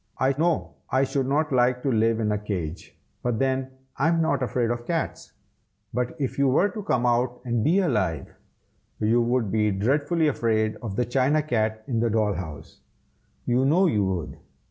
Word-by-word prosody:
I 135 +1 +2
know 165 +2 0
I 130 +1 +2
should 135 -1 -1
not 150 +3 +1
like 125 -1 +2
to 135 - +1
live 115 0 +2
in 105 -2 0
a 105 - +1
cage, 90 -6 -5 0.2
but 120 -2 -1
then 130 0 0 0.3
I 140 - +2
am 165 0 +2
not 150 -4 +1
afraid 120 -2 0
of 120 0 -4
cats. 165 -2 -3 0.6
But 125 +6 -2
if 135 -1 -2
you 140 - +4
were 160 +10 +3
to 215 - -6
come 125 -10 0
out 120 +1 +1
and 120 -2 0
be 165 +7 +3
alive, 95 - -1 0.7
you 115 +3 +3
would 120 -3 0
be 105 -1 +2
dreadfully 145 - +1
afraid 110 -5 +1
of 110 -5 -6
the 125 - +1
china 135 +5 +2
cat 110 -5 -1
in 120 -4 -1
the 115 0 +1
doll 110 -2 +1
house, 80 -6 -8 0.7
you 125 +2 +2
know 165 +8 +4
you 105 - +2
would. 95 -4 -3
125 Hz, 190 wpm, -25 LUFS, 110-140 Hz, 0.7 s, you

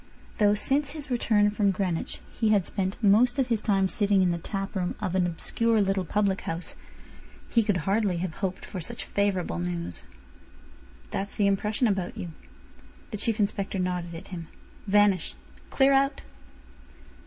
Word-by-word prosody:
Though 205 -1 +5
since 280 +7 0
his 290 -4 -8
return 210 -4 +3
from 205 -1 +2
Greenwich 185 -3 -2
he 225 -2 +1
had 205 -4 +3
spent 190 -1 -2
most 230 +6 +5
of 260 -2 +1
his 225 -3 +1
time 195 -3 +2
sitting 200 -1 +2
in 180 - +3
the 170 - -2
tap 195 +4 -4
room 180 -2 -1
of 180 - -2
an 185 -2 +2
obscure 225 +6 +1
little 195 -2 +1
public 200 +2 +1
house, 165 +1 -5 0.7
he 230 - +4
could 205 -4 +1
hardly 200 -2 +1
have 175 -1 -3
hoped 190 -2 -3
for 185 - -6
such 230 +8 -5
favourable 190 - 0
news. 85 -2 -4 1.1
"That's 200 +1 -3
the 205 - +2
impression 210 +4 +1
about 195 -5 -1
you." 175 - -5 0.8
The 210 - -3
Chief 220 +2 -1
Inspector 200 -1 -1
nodded 180 -2 -2
at 165 - -9
him. 170 -3 -6 0.4
"Vanish. 205 -2 +3 0.3
Clear 275 0 +4
out." 275 +1 +2
200 Hz, 165 wpm, -27 LUFS, 180-215 Hz, 1.1 s, Though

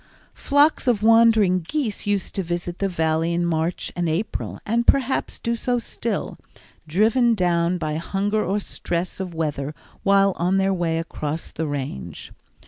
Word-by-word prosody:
Flocks 285 0 +2
of 220 -4 +2
wandering 225 -4 +5
geese 220 - -3
used 205 -2 -1
to 195 - -1
visit 175 0 -4
the 195 - 0
Valley 160 -1 0
in 175 0 +1
March 165 +1 -1
and 175 -2 0
April, 170 +8 -3
and 235 +2 0
perhaps 265 -1 +2
do 235 -1 -1
so 245 +1 0
still, 230 -1 -4 0.5
driven 225 +8 +3
down 175 -2 +1
by 155 -2 -2
hunger 205 +5 -1
or 195 +3 0
stress 175 -3 -3
of 180 -3 -5
weather 150 -2 -2 0.3
while 195 0 +4
on 180 +3 +1
their 195 0 +2
way 170 -3 0
across 160 -1 -4
the 160 0 -3
Range. 135 - -5
185 Hz, 155 wpm, -23 LUFS, 165-215 Hz, 0.5 s, wandering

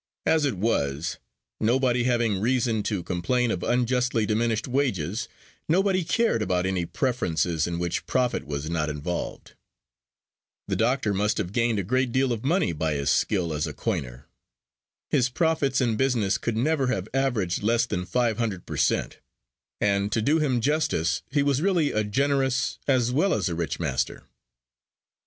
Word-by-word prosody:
As 160 -2 +3
it 135 -7 0
was, 80 -5 -1 0.4
nobody 120 +1 +2
having 120 -5 +1
reason 120 -2 +1
to 100 -5 -2
complain 115 +8 0
of 85 - -2
unjustly 125 -1 +1
diminished 115 +1 0
wages, 120 - -1 0.4
nobody 190 +2 +2
cared 205 - +1
about 90 -3 0
any 95 -3 -1
preferences 85 - 0
in 85 -1 -3
which 85 0 -2
profit 125 - 0
was 70 0 -4
not 80 -2 -1
involved. 75 +4 -5 1.1
The - - -1
doctor 115 -2 +1
must 105 +2 0
have 90 - -2
gained 115 -2 +1
a 100 - 0
great 125 +5 0
deal 130 0 +2
of 115 - -5
money 165 - +1
by 80 0 -1
his 70 -1 0
skill 90 -6 +1
as 75 +2 -1
a 75 - -5
coiner. 65 -1 -4 0.9
His 125 -1 +3
profits 145 -2 +1
in 115 -3 +1
business 120 -7 +1
could 115 -2 -2
never 140 +2 +1
have 95 -6 -1
averaged 120 -10 0
less 115 +2 +2
than 90 -5 -3
five 120 +2 0
hundred 105 -6 -2
per - - -6
cent; - - 0 0.6
and, 100 0 +1
to 115 - +1
do 145 +9 +2
him 130 -6 +1
justice, 140 - +1
he 140 +1 +1
was 140 0 +1
really 175 -6 +2
a 110 - 0
generous 135 +3 0
as 125 -3 +2
well 170 +9 +2
as 95 -3 0
a - - -2
rich 85 0 -3
master. 70 -6 -2
115 Hz, 165 wpm, -26 LUFS, 90-130 Hz, 1.1 s, As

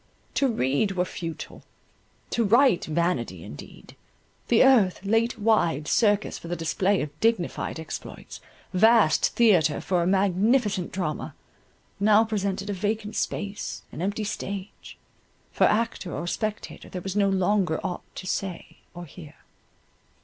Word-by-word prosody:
To 275 - +2
read 195 - 0
were 180 -1 0
futile—to 170 +7 -7
write, 235 -1 +4
vanity 150 - -1
indeed. 75 - -12 0.5
The 235 - +5
earth, 230 -10 +4
late 225 +3 +1
wide 170 -9 +1
circus 205 -2 +2
for - - -10
the 175 - -2
display 185 +4 0
of 150 - -6
dignified 225 -7 0
exploits, 160 - -8 0.3
vast 220 -3 +5
theatre 180 -10 +4
for 180 -2 0
a 170 - 0
magnificent 195 +1 +2
drama, 180 -5 -4 0.6
now 210 +2 +5
presented 200 -2 -2
a - - -2
vacant 210 +2 -3
space, 200 0 -3
an - - -7
empty 200 +3 -2
stage—for 200 -1 -5
actor 220 -5 0
or - - -4
spectator 215 +4 -4
there 180 -2 -6
was 195 0 -4
no 200 -1 +3
longer 190 -3 +1
aught 180 - -3
to 185 - -7
say 185 -1 -4 0.2
or 175 0 -7
hear. 155 -1 -13
195 Hz, 130 wpm, -25 LUFS, 175-215 Hz, 0.6 s, The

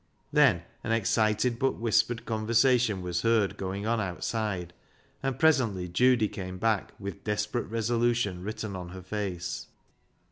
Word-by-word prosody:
Then - - +5 0.2
an 115 - -2
excited 115 +2 +1
but 135 - +2
whispered 115 +1 +1
conversation 115 -2 +2
was 90 -1 -1
heard 115 -3 +2
going 95 +2 -4
on 115 0 +1
outside, 95 -1 -3 0.5
and 135 -2 -2
presently 115 - +3
Judy 120 +5 +3
came 95 -2 -6
back 110 0 0
with 100 -3 -7
desperate 105 +2 -1
resolution 115 -3 0
written 105 0 -5
on 90 -1 -6
her 95 0 -9
face. 95 -3 -4
110 Hz, 135 wpm, -28 LUFS, 95-115 Hz, 0.5 s, Then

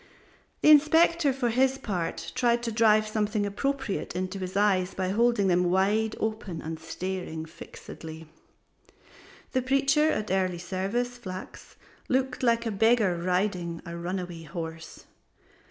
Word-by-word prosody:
The 305 - +8
Inspector 315 +1 +5
for 250 -2 0
his 260 +3 +2
part 180 -9 -4
tried 240 -1 +2
to 230 - -2
drive 215 -1 +4
something 215 -1 0
appropriate 265 -1 -2
into 185 +2 -3
his 185 +1 -4
eyes 195 -3 +2
by 185 -1 -1
holding 230 0 +2
them 180 -1 +3
wide 205 +4 +2
open 215 -6 -3
and 160 0 -6
staring 165 0 -5
fixedly. 160 0 -10 1.2
The 260 - +1
Preacher 275 +4 +3
at 215 -8 -2
Early 185 -2 +1
Service 195 +8 -3
Flachs 185 -4 -9 0.3
looked 260 0 0
like 235 -1 +2
a 225 - -1
Jew 200 - -6
beggar 220 -4 +4
riding 180 -1 -1
a 170 - -6
runaway 175 0 -4
horse. 160 0 -7
200 Hz, 140 wpm, -27 LUFS, 180-240 Hz, 1.2 s, The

